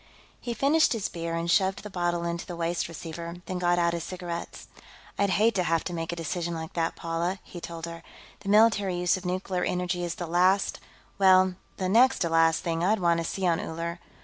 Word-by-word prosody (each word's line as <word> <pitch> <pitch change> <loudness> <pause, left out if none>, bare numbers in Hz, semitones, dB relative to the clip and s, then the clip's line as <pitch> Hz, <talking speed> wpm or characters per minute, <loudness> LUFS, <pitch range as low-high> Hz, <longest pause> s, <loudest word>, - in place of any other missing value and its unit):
He 240 -1 -4
finished 290 +6 +3
his 220 -4 -2
beer 165 -1 -4
and 165 0 -2
shoved 190 +1 +2
the 210 - -7
bottle 175 -1 -1
into 170 0 -3
the 175 - -5
waste 170 0 -1
receiver, 170 +1 -7
then 185 -1 -4
got 175 0 +2
out 170 -1 +2
his 170 -1 -3
cigarettes. 175 -2 -6 0.5
"I'd 200 0 +3
hate 220 +5 +3
to 185 - +1
have 165 -1 +1
to 175 - -5
make 165 -1 -3
a - - -3
decision 170 +1 -3
like 160 0 -6
that, 165 -1 -1
Paula," 170 +3 -2
he 175 - -10
told 165 -1 -6
her. 170 0 -8 0.4
"The 195 - -6
military 205 -3 +4
use 175 +1 +2
of 185 -1 -6
nuclear 185 0 -2
energy 180 0 -1
is 170 -1 -3
the 175 - -4
last 185 +4 +2 0.4
well, 185 -1 +6 0.2
the 185 - -1
next 245 +7 +5
to 170 - 0
last 165 0 +3
thing 165 0 -1
I'd 210 +4 +2
want 170 -2 +2
to - - -1
see 190 +3 -3
on 170 -2 +2
Uller. 170 +1 -4
175 Hz, 220 wpm, -27 LUFS, 170-190 Hz, 0.5 s, well